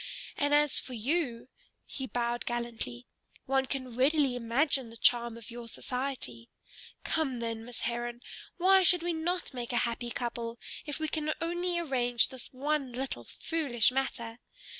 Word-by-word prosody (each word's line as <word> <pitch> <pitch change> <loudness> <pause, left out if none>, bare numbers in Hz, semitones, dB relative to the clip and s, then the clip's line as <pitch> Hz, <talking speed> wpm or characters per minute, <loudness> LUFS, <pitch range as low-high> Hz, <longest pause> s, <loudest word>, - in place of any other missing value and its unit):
And 290 0 +1
as 295 -2 +5
for 255 - -7
you," 250 0 0 0.4
he 265 -1 -5
bowed 240 -1 -1
gallantly, 235 - -3 0.4
"one 265 0 +2
can 255 -3 -4
readily 275 0 +3
imagine 245 +2 +1
the 230 - -11
charm 235 -1 +4
of 230 0 -9
your 235 0 -7
society. 250 - -4 0.5
Come, 280 -6 +1
then, 230 -1 -3
Miss 245 0 -8
Heron, 240 0 -2 0.4
why 380 +2 +6
should 355 -1 +6
we 345 0 +1
not 345 0 -1
make 245 -1 -4
a 240 - +1
happy 235 0 -2
couple, 235 -1 -3 0.3
if 295 0 -3
we 315 - 0
can 310 0 -1
only 345 +1 0
arrange 250 -7 +2
this 260 -1 -9
one 275 -1 -1
little 250 - -3
foolish 275 - +1
matter? 240 -3 -2
250 Hz, 155 wpm, -31 LUFS, 235-295 Hz, 0.5 s, why